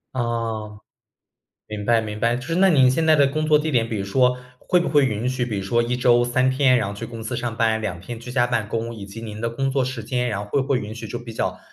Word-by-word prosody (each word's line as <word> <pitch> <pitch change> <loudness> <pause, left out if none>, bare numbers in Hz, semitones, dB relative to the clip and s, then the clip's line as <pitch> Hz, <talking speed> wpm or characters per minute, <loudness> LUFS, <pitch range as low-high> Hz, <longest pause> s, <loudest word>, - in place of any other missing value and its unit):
哦， 115 -3 -3 0.9
明 105 -1 -6
白 115 0 +3
明 105 -1 -6
白， 115 +1 +2
就 125 - -6
是 165 - -2
那 190 +2 +5
您 135 -7 +5
现 160 +5 +1
在 160 -1 +5
的 140 -1 +5
工 155 +3 -1
作 150 -1 +5
地 155 +1 -2
点 115 -3 +2
比 110 - -3
如 100 - -2
说 125 +5 +2 0.2
会 180 - +2
不 175 - -1
会 145 -2 +4
允 120 0 -1
许 130 -1 -1
比 110 -5 -3
如 95 - -4
说 120 +5 +2
1 120 +1 -1
周 120 -1 +4
3 130 +1 +2
天 130 -2 +4
然 120 - -1
后 100 - -5
去 100 - -6
公 115 -1 -8
司 120 +1 -3
上 120 -2 -3
班， 110 -1 +2
2 95 -5 -4
天 115 +5 -8
居 125 +1 -9
家 120 -1 +2
办 115 -4 -1
公。 115 +1 -3
以 105 -3 -8
及 100 +3 -9
您 110 -1 -7
的 115 - -1
工 135 +3 -1
作 130 -1 +1
时 130 -4 -5
间， 125 +1 -1
然 105 - -2
后 100 0 -6
会 135 +5 +1
不 135 - -8
会 135 -3 +2
允 105 -1 -6
许 115 - -8
就 120 - -4
比 120 -1 -9
较 - - -2
120 Hz, 300 characters per minute, -22 LUFS, 110-130 Hz, 0.9 s, 那